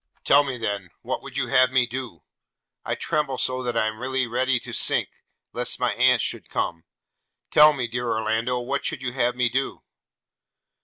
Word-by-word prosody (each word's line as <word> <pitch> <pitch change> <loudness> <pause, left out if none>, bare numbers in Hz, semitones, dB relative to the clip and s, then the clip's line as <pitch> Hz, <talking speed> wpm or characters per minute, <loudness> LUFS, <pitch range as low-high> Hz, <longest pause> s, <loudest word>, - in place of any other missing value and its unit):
'Tell 145 +1 +5
me 135 -3 -4
then, 100 -5 -3
what - - -3
would - - -9
you - - -1
have 130 -1 +5
me 130 -1 +3
do? 120 -8 -7 0.6
I - - -2
tremble 145 -4 -1
so 130 0 -1
that 120 -2 -2
I 110 - +2
am 110 0 -3
really 130 +1 -1
ready 125 +2 +1
to - - -8
sink, - - +2 0.4
lest 125 0 0
my 125 -1 +1
aunt 125 -2 +4
should - - -3
come: 85 -1 -3 0.7
tell 150 +1 +8
me, 130 -5 -3
dear 120 +1 -3
Orlando, 110 +3 0
what 135 +3 -2
would - - -7
you 125 - -2
have 125 -2 0
me 125 -1 +2
do?' 135 +3 -2
125 Hz, 190 wpm, -24 LUFS, 115-130 Hz, 0.7 s, tell